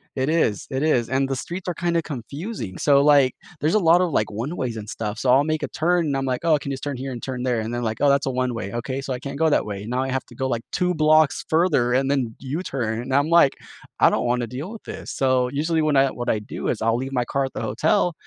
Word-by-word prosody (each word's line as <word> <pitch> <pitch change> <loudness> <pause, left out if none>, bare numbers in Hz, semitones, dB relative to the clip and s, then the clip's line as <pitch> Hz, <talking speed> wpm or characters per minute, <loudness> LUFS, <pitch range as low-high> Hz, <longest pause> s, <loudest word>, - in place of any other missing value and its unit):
It 130 +2 0
is, 155 -11 +1
it 135 +2 -2
is, 120 -7 +2
and 135 0 +1
the 135 - -2
streets 175 +8 -6
are 180 - 0
kind 170 -1 0
of 165 - 0
confusing. 140 - -6
So 140 -1 +4
like, 140 -3 +5 0.3
there's 155 +6 +1
a 215 - +4
lot 170 0 +5
of, 180 -3 +1
like, 105 - +1
one-ways 120 +1 -4
and 105 -1 -7
stuff, 110 0 -4
so 125 +1 +1
I'll 135 +3 +5
make 155 0 -1
a - - -1
turn 170 +1 +1
and 140 -2 -1
I'm 135 0 -1
like, 125 -1 -1
"Oh, 155 -2 +4
can 140 - -6
you - - -2
just - - -11
turn 145 -3 -3
here 135 +1 -5
and 120 - -6
turn 130 -2 -4
there?" 125 -3 0
and 110 +2 -4
then 120 - -2
like, 110 -1 -2
"Oh, 145 - +4
that's 140 0 +2
a - - +2
one-way, 125 -6 -2
okay, 130 +3 -3
so 135 - -6
I 125 - -1
can't 140 +2 -6
go 160 -1 +4
that - - +2
way, 100 0 -5
now 125 +2 -1
I 135 - -3
have 130 - -1
to - - -16
go 130 -1 -2
like 120 -3 -2
2 180 -1 +1
blocks 155 -1 +3
further 155 -7 +2
and 135 +2 +2
then 125 -5 -1
U-turn," 130 -6 -3
and 130 +2 -5
I'm 145 +3 +2
like, 170 -5 +5 0.5
"I - - +6
don't - - 0
wanna 120 0 +1
deal 135 - -6
with 225 - -10
this." - - -8
So, 130 -2 +1
usually 160 +3 0
when 155 -2 +1
I 135 0 +4
what 120 - -4
I 110 - +2
do 105 - -6
is - - -1
I'll 115 0 +2
leave 130 +2 -3
my 125 -1 0
car 140 +1 -1
at 130 - -7
the - - -4
hotel, 175 +1 +1
135 Hz, 290 wpm, -23 LUFS, 125-155 Hz, 0.5 s, I